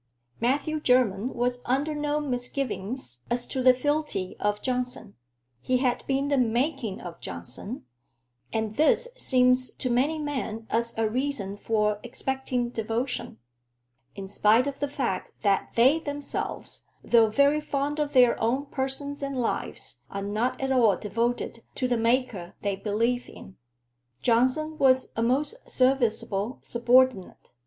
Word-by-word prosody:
Matthew 285 +6 0
Jermyn 250 -4 +2
was 245 +1 0
under 275 +5 0
no 295 0 -1
misgivings 245 - -4
as 240 0 0
to 260 - -3
the 255 0 +8
fealty 290 -7 -1
of 210 0 0
Johnson. 250 -4 -3 0.5
He 255 - +1
had 250 -1 0
"been 275 +1 0
the 280 -2 +2
making 245 -2 0
of 170 -2 -9
Johnson"; 120 - -7 0.7
and 220 -1 -2
this 395 +11 +3
seems 255 - +3
to 255 - -3
many 275 +6 +2
men 265 -7 -4
as 230 0 -1
a 225 -1 +2
reason 235 -4 -2
for 210 0 0
expecting 255 0 -2
devotion, 230 - -3 0.8
in 195 -1 -6
spite 215 +5 +4
of 280 -1 -4
the 285 - 0
fact 255 -10 -3
that 200 -2 +2
they 265 +7 +5
themselves, 290 -2 -5 0.2
though 230 -2 +5
very 280 +6 +3
fond 290 +1 -2
of 295 -1 -1
their 250 -3 +5
own 255 +5 +1
persons 280 +1 -3
and 275 -2 -3
lives, 235 - -3
are 200 0 -4
not 215 +5 -1
at 270 0 -1
all 230 -7 +4
devoted 230 +2 -2
to 255 - 0
the 245 - +1
Maker 230 -6 0
they 200 -1 0
believe 230 +5 -1
in. 95 - -12 0.7
Johnson 260 +7 +2
was 260 -1 +4
a 225 - -1
most 275 - +1
serviceable 245 -4 +1
subordinate. 245 -3 +2
250 Hz, 140 wpm, -27 LUFS, 225-275 Hz, 0.8 s, the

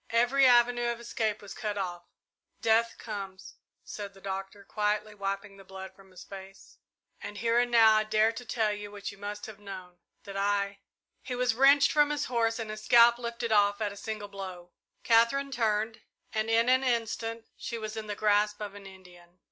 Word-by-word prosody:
Every 245 +4 +4
avenue 240 0 +4
of 235 - -6
escape 220 -3 -2
was 205 - -8
cut 210 -1 -4
off. 175 -3 -3 0.6
"Death 230 0 +2
comes," 195 -3 -7 0.3
said 200 -2 -7
the - - -15
Doctor, 195 +1 -6
quietly, 210 +1 -1
wiping 200 0 -4
the 195 - -13
blood 190 0 -9
from 195 -1 -18
his 185 -1 -12
face; 195 0 -12 0.4
"and 205 - -7
here 230 +2 +2
and 245 0 +1
now 225 -2 +6
I 215 - +3
dare 215 +1 +3
to 230 +2 -8
tell 220 -2 0
you 205 0 -7
what 205 -1 -6
you 200 - -15
must 205 +1 -6
have 215 -1 -10
known, 185 -3 -10 0.2
that 200 -1 -9
I 200 0 0 0.2
" - - -52
He 250 - -5
was 250 -1 +1
wrenched 275 +3 +5
from 295 -1 +4
his 295 0 -1
horse 230 -2 0
and 225 -2 -5
his 215 0 -8
scalp 235 +1 +6
lifted 235 -1 -4
off 205 -1 +3
at 210 -2 -2
a - - -12
single 215 0 -5
blow. 185 -3 -8 0.3
Katherine 235 +5 +3
turned, 220 -2 0 0.3
and 215 0 -1
in 230 +1 +3
an 260 +1 +4
instant 230 -2 -2
she 235 - -5
was 215 0 -6
in 220 -1 -5
the 205 - -3
grasp 210 0 +2
of 205 -2 -6
an 200 -1 -11
Indian. 180 -2 -16
215 Hz, 200 wpm, -29 LUFS, 200-235 Hz, 0.6 s, now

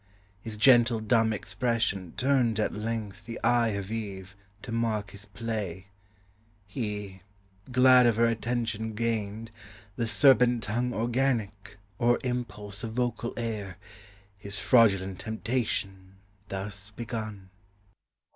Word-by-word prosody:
His 110 +1 -4
gentle 120 -1 +5
dumb 110 0 +2
expression 105 -3 -1
turned 125 -5 +2
at 110 - 0
length 105 -2 -4
The 115 - -6
eye 120 -1 +4
of 100 +1 -6
Eve, 95 -4 -5 0.3
to 115 - -7
mark 110 -4 -1
his 100 0 -10
play; 100 -3 -5 0.8
he, 105 -3 -5 0.5
glad 125 0 +6
Of 115 - +3
her 115 +1 +4
attention 115 -2 -2
gained, 110 -1 -2 0.4
with 115 -2 -2
serpent 120 -1 +5
tongue 120 +4 -1
Organic, 115 -4 -1 0.2
or 120 0 +4
impulse 105 -5 -4
of 110 -1 -4
vocal 120 -1 -2
air, 105 -6 -4 0.6
His 100 0 -4
fraudulent 95 -3 +3
temptation 105 -5 -3 0.3
thus 100 +1 -3
began. 110 -4 -6
110 Hz, 115 wpm, -28 LUFS, 100-120 Hz, 0.8 s, glad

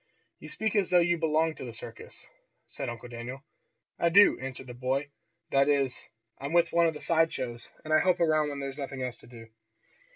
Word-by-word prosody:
"You - - -10
speak 220 -1 -1
as 200 -3 +2
though 180 - +5
you 175 -1 +3
belonged 160 0 +1
to - - -7
the 120 -3 -7
circus," - - -10 0.4
said - - -6
Uncle 120 +1 -7
Daniel. 120 +3 -7 0.6
"I 170 - +3
do," 200 +4 +6
answered 130 0 -6
the 125 - -9
boy. 135 +4 -2 0.4
"That 140 +1 +4
is, 140 -3 +2 0.4
I'm 140 +3 -5
with 170 -1 +3
one 170 0 +5
of 160 - -2
the - - -8
side 165 -1 +3
shows, 120 -2 -5 0.2
and 155 - -1
I 155 - +6
help 185 -1 +2
around 155 -2 +2
when 140 -1 -5
there's 135 +1 -5
nothing 135 -2 -4
else 125 -2 -4
to - - -16
do." 115 -2 -12
145 Hz, 215 wpm, -29 LUFS, 130-165 Hz, 0.6 s, do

